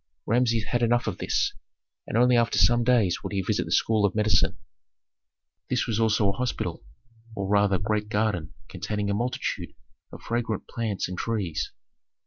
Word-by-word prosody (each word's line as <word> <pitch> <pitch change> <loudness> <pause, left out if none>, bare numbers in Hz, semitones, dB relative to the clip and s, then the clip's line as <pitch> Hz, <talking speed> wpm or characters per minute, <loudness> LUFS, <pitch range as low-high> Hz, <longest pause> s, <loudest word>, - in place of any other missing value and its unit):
Rameses 115 -1 +2
had 120 +2 -1
enough 120 +1 +2
of 100 -5 -3
this, - - 0 0.5
and - - -1
only 125 +1 +5
after 115 -1 +2
some 120 0 +4
days 115 -7 +2
would - - -5
he 95 -1 0
visit - - 0
the - - -8
school 110 -2 +2
of 100 - +2
medicine. 105 0 +2 1.1
This - - +1
was 110 -1 -1
also 110 -2 +3
a 100 - -1
hospital, 125 +2 -3 0.5
or 100 -2 -3
rather 100 -1 +3
great 105 +1 -1
garden 105 -7 -1
containing 100 +2 -3
a - - +1
multitude 120 +5 -3 0.4
of - - -11
fragrant 115 -2 -2
plants 110 -4 -2
and 90 0 -6
trees. 105 -8 -2
110 Hz, 165 wpm, -26 LUFS, 100-115 Hz, 1.1 s, only